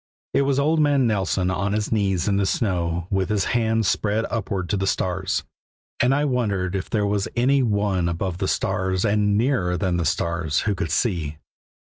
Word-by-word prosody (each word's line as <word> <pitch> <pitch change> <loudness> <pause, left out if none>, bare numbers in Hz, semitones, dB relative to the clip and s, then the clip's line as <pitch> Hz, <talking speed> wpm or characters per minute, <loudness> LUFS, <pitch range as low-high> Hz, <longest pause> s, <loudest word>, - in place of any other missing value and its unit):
It - - +3
was 135 -1 +1
old 155 +3 +2
man 145 -3 +3
Nelson 95 -4 0
on 100 +3 -1
his 105 -1 -1
knees 95 -5 +1
in 100 -1 +2
the 100 -1 +1
snow, 85 -5 -1
with 95 -2 0
his 105 -3 +1
hands 115 -3 +1
spread 105 +5 0
upward 100 -5 -2
to - - +1
the 95 0 -1
stars, 95 0 -1 0.6
and 125 - +3
I 145 +1 +1
wondered 100 -9 -1
if 95 - -3
there 105 -2 0
was 100 -1 0
any 135 +3 +3
One 100 -6 +1
above 85 +1 -3
the 95 - -1
stars 95 +2 0
and 105 -1 +2
nearer 110 -8 +1
than 90 -3 0
the 85 - -1
stars 80 0 0
who 105 - 0
could 100 +1 -3
see. 80 - -1
100 Hz, 195 wpm, -23 LUFS, 90-115 Hz, 0.6 s, It